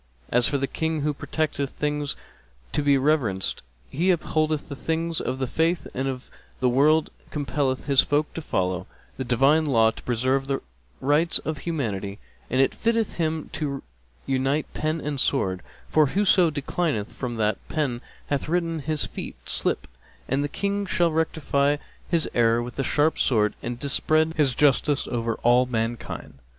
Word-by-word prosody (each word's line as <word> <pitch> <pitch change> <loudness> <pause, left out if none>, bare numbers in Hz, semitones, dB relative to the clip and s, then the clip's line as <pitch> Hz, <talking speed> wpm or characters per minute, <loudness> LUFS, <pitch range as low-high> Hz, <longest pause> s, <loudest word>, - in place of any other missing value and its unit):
As 120 0 +4
for 140 - +1
the 135 - 0
King 160 +2 -2
who 150 +1 0
protecteth 145 -1 -2
things 150 0 -2 0.6
to - - +1
be 140 -1 +4
reverenced, 130 -10 +1 0.3
he 170 - 0
upholdeth 155 -3 +1
the 140 - -6
things 165 +2 -1
of 130 - -2
the 130 - -1
Faith 165 +6 0
and 130 +1 -2
of 130 -2 -4 0.3
the 125 - +3
World 150 +5 +3
and - - -27
compelleth 140 -2 -1
his 140 -2 +5
folk 150 +1 0
to 165 - -5
follow 90 - -1 0.3
the 130 - -2
Divine 135 +6 +4
Law 115 -7 +4
and - - -8
to - - -8
preserve 130 +3 0
the 135 -1 -1 0.4
rights 150 +5 +3
of 155 -2 -4
humanity; 105 - -3 0.3
and 130 - +1
it 135 - +4
fitteth 230 -2 0
him 160 -2 -1
to 140 -3 -3 0.4
unite 135 +3 +1
Pen 155 +1 -1
and 145 -2 -3
Sword; 95 -10 +1 0.3
for 155 -2 +4
whoso 185 0 +4
declineth 145 -5 -2
from 120 -3 -4
what 105 -2 +1
Pen 135 -6 -1 0.2
hath 145 +1 -2
written 165 -1 0
his 155 0 0
feet - - -7
slip - - +1 0.4
and 135 +2 +1
the 145 - -2
King 200 +4 -1
shall 175 -2 +2
rectify 145 -3 +1 0.3
his 170 -2 +2
error 115 0 +3
with 120 0 -8
the 135 - 0
sharp 150 +4 +2
Sword 105 -4 +2
and 120 0 -4
dispread 155 +4 +2
his 140 -5 +2
justice 145 0 +3
over 115 -1 -1
all 125 +1 +5
mankind. 115 - -4
140 Hz, 170 wpm, -25 LUFS, 125-155 Hz, 0.6 s, his